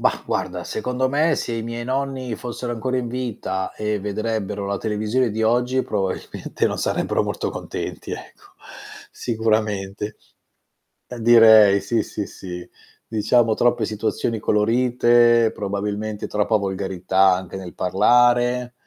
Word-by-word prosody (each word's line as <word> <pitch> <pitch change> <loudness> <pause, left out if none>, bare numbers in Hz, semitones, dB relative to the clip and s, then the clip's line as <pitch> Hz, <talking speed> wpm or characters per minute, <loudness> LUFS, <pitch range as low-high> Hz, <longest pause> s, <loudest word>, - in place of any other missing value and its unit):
Mah, - - +1
guarda, - - -3
secondo 125 +1 -2
me 155 +3 +2
se 120 - -3
i 115 - -3
miei 115 0 -5
nonni 130 -2 -3
fossero 120 +1 -5
ancora 130 +2 -2
in 120 -1 -3
vita 115 -6 -4
e 105 -1 -2
vedrebbero 105 0 -3
la 100 0 -2
televisione 110 +3 0
di 110 +1 -2
oggi 125 +3 +2
probabilmente 95 -3 -2
non - - -4
sarebbero - - 0
molto - - -3
contenti - - -6
ecco, - - -10 0.7
sicuramente. 110 -3 -2 0.9
Eh 125 -1 -9
direi 110 -3 +7
sì, 110 +3 0
sì, 105 - -5
sì, 90 -2 -8 0.4
diciamo 110 +1 +2
troppe 120 +1 +2
situazioni 110 +1 -2
colorite, 120 +1 +3
probabilmente 105 +1 -3
troppa 105 +1 +1
volgarità 95 -1 +1
anche 95 0 -7
nel 95 -2 -8
parlare, 120 +5 +3
110 Hz, 125 wpm, -22 LUFS, 100-120 Hz, 0.9 s, direi